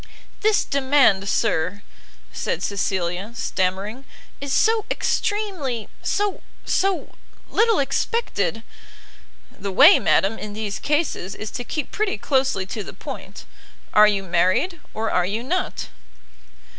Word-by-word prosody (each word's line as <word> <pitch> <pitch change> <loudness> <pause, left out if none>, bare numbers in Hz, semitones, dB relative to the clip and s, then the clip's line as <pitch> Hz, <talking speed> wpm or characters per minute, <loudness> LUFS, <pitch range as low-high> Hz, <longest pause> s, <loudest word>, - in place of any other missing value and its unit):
"This 430 0 +2
demand, 265 -8 +3
sir," 200 -1 0 0.5
said - - -2
Cecilia, 190 +1 -2
stammering, 195 +5 -2 0.4
"is 280 -1 -4
so 440 +7 +3
extremely 360 - -1
so 410 -1 -1 0.2
so 385 -1 0 0.4
little 450 -1 +3
expected 270 - -1 0.5
" - - -27
"The 200 0 -3
way, 285 - +8
madam, 200 +4 +2
in 210 -1 -6
these 210 -1 -4
cases, 295 - -1
is 215 - -6
to 245 - -4
keep 295 +3 -4
pretty 425 - -1
closely 260 -4 +1
to 205 +2 -5
the - - -9
point; - - -9 0.5
are 210 0 +8
you 200 -2 +1
married 185 - +1 0.2
or 220 0 -1
are 180 - +2
you 215 +4 -2
not?" 360 +8 -2
225 Hz, 125 wpm, -22 LUFS, 195-315 Hz, 0.5 s, way